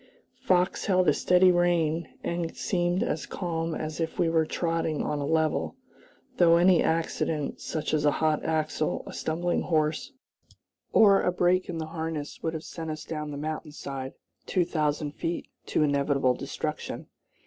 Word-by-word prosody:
Fox 185 Hz, -8 st, +1 dB
held 185 Hz, -2 st, +3 dB
a -, -, +6 dB
steady 180 Hz, 0 st, +5 dB
rein, 170 Hz, -2 st, +1 dB
and 170 Hz, -1 st, -3 dB
seemed 175 Hz, -1 st, 0 dB
as 150 Hz, -, -2 dB
calm 165 Hz, -3 st, -3 dB
as 155 Hz, +1 st, -4 dB
if 165 Hz, -1 st, -2 dB
we 170 Hz, -2 st, +2 dB
were 160 Hz, -1 st, +2 dB
trotting 165 Hz, -3 st, -1 dB
on 150 Hz, -, -1 dB
a 140 Hz, -, -2 dB
level, 160 Hz, -1 st, +1 dB, 0.6 s
though 170 Hz, -1 st, +6 dB
any 175 Hz, 0 st, +5 dB
accident, 160 Hz, -2 st, -1 dB
such 155 Hz, -1 st, -3 dB
as 150 Hz, -1 st, +2 dB
a 150 Hz, -, +5 dB
hot 155 Hz, -1 st, +1 dB
axle, 155 Hz, -1 st, -1 dB
a -, -, -8 dB
stumbling 170 Hz, +2 st, -1 dB
horse, 155 Hz, -, 0 dB, 0.8 s
or 200 Hz, -2 st, +6 dB
a 180 Hz, -, +2 dB
break 180 Hz, +1 st, +2 dB
in 170 Hz, -, -3 dB
the 160 Hz, -, -3 dB
harness 160 Hz, -2 st, -5 dB
would 160 Hz, 0 st, -2 dB
have 160 Hz, -, -5 dB
sent 165 Hz, -1 st, -6 dB
us 155 Hz, 0 st, -5 dB
down 150 Hz, -2 st, -4 dB
the 145 Hz, -, -5 dB
mountain 155 Hz, +1 st, -4 dB
side, 135 Hz, -3 st, -6 dB, 0.3 s
two 180 Hz, -3 st, +2 dB
thousand 150 Hz, -3 st, -1 dB
feet, 165 Hz, +3 st, -3 dB, 0.2 s
to -, -, +2 dB
inevitable 140 Hz, -2 st, +2 dB
destruction. -, -, -4 dB
160 Hz, 165 wpm, -27 LUFS, 155-175 Hz, 0.8 s, a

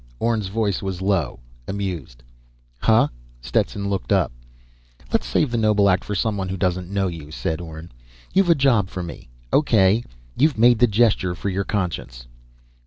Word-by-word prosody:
Orne's 115 Hz, -, 0 dB
voice 100 Hz, -1 st, -1 dB
was 95 Hz, -2 st, -4 dB
low, 95 Hz, -10 st, 0 dB, 0.3 s
amused. 90 Hz, -11 st, -5 dB, 0.6 s
"Huh?" -, -, +4 dB, 0.3 s
Stetson 100 Hz, +10 st, -1 dB
looked 100 Hz, -3 st, -3 dB
up. -, -, +3 dB, 0.8 s
"Let's -, -, +1 dB
save 145 Hz, -, +1 dB
the 120 Hz, -, 0 dB
noble 105 Hz, -2 st, +3 dB
act 90 Hz, 0 st, +1 dB
for 105 Hz, -, -4 dB
someone 100 Hz, -2 st, -1 dB
who 95 Hz, -, -3 dB
doesn't 90 Hz, -1 st, -1 dB
know 100 Hz, -1 st, 0 dB
you," 80 Hz, -4 st, -7 dB
said 80 Hz, +1 st, -3 dB
Orne. 80 Hz, 0 st, -9 dB, 0.4 s
"You've 190 Hz, -1 st, +3 dB
a 170 Hz, -, +6 dB
job 125 Hz, -9 st, +3 dB
for 95 Hz, -2 st, -5 dB
me. 85 Hz, -7 st, -9 dB, 0.2 s
O.K. 110 Hz, -6 st, +4 dB, 0.3 s
You've 145 Hz, -2 st, +2 dB
made 120 Hz, 0 st, +5 dB
the 125 Hz, -, +6 dB
gesture 105 Hz, -5 st, +2 dB
for 100 Hz, -, -3 dB
your 95 Hz, +1 st, -2 dB
conscience." 80 Hz, -, -3 dB
100 Hz, 165 wpm, -22 LUFS, 90-110 Hz, 0.8 s, a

